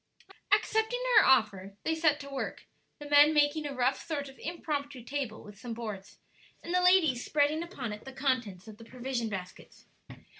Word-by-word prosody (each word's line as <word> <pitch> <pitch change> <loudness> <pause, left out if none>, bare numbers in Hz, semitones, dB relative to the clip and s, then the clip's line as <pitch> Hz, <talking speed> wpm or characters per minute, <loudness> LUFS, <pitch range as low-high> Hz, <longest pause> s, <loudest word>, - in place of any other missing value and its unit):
Accepting 445 +3 +2 0.2
her 425 - +8
offer, 200 -6 +2
they 320 - 0
set 315 -2 +2
to 280 - -9
work, 275 - -5 0.3
the 295 - -9
men 290 +1 +6
making 295 +1 +2
a 280 - -6
rough 255 +1 0
sort 285 -4 -4
of 270 - -16
impromptu 285 -6 -4
table 260 -4 -4
with 205 -1 -13
some 235 0 -6
boards, 210 -4 -7 0.5
and 340 - -5
the 360 - +3
ladies 350 -9 +4
spreading 300 +2 +1
upon 275 - -5
it 210 - -10
the 265 - -9
contents 250 -8 -2
of 215 -1 -11
the 230 - -13
provision 245 -1 -4
baskets. 185 -3 -9
270 Hz, 180 wpm, -30 LUFS, 230-305 Hz, 0.5 s, her